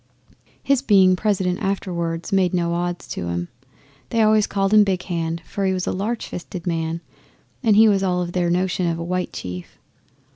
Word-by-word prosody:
His 275 -2 +2
being 190 -7 +5
President 185 -2 0
afterwards 175 -3 -2
made 185 -2 +2
no 170 -1 0
odds 175 0 -3
to 85 - -4
'em. 85 0 -3 0.6
They 230 -2 +2
always 215 -1 +4
called 195 0 0
him 210 -1 +8
Big 185 -3 -1
Hand, 165 -2 -3
for 200 - -4
he 190 -1 +2
was 185 -1 -2
a - - -1
large 220 +5 -2
fisted 175 0 -7
man, 165 -1 -2 0.6
and 220 -5 +4
he 220 +1 +7
was 200 -2 +3
all 180 -2 +1
of 175 -1 -2
their 175 -1 0
notion 180 0 0
of 165 -1 -1
a 165 - -4
white 180 +1 -2
chief. 90 -1 -7
180 Hz, 190 wpm, -22 LUFS, 170-200 Hz, 0.6 s, him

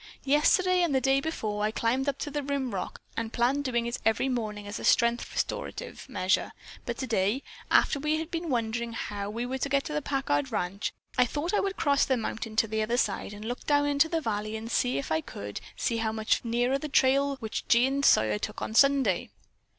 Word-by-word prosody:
Yesterday 360 +6 +4
and 335 -6 +1
the - - +4
day 270 +1 +2
before 215 -10 -3
I 210 - +2
climbed 245 +5 0
up 280 - -3
to 290 - -4
the 290 +1 -2
rim 275 -4 -2
rock 185 - -4 0.2
and 230 -1 -3
planned 260 +5 +1
doing 240 -2 0
it 235 +1 -3
every 225 +4 +2
morning 215 -4 -3
as 205 0 -5
a - - -8
strength 235 0 +3
restorative - - -4
measure, 185 -5 0 0.3
but 235 -1 -2
today, 225 -1 0 0.3
after 280 - +4
we 300 +2 +1
had 320 +1 -5
been 330 0 -3
wondering 235 -1 -1
how 205 -2 -4
we 230 +3 -3
were 260 +2 -3
to 280 - -1
get 275 0 +2
to 300 - -5
the 300 - 0
Packard 255 - -1
ranch, 185 +3 -2 0.3
I 250 - +5
thought 300 - -3
I - - +3
would 390 -1 -2
cross 285 -2 +3
the 260 - +1
mountain 225 -1 -4
to 225 - +3
the 220 0 -1
other 235 +3 0
side 205 -4 -1
and 210 +1 -8
look 245 +2 -4
down 290 -1 +3
into 290 +2 +3
the 330 -1 0
valley, 215 -3 -2
and 225 +1 -6
see 125 - +1
if 140 - -4
I 160 0 +2
could, 100 -8 -7 0.4
how 220 -1 0
much 220 0 0
nearer 240 +2 +1
was 275 - +1
the 305 - -5
trail 275 +1 +3
which 225 -5 -5
Jean 265 +4 +3
Sawyer 110 - +4
took - - -5
on - - -4
Sunday. 265 -7 +3
245 Hz, 220 wpm, -28 LUFS, 220-280 Hz, 0.4 s, I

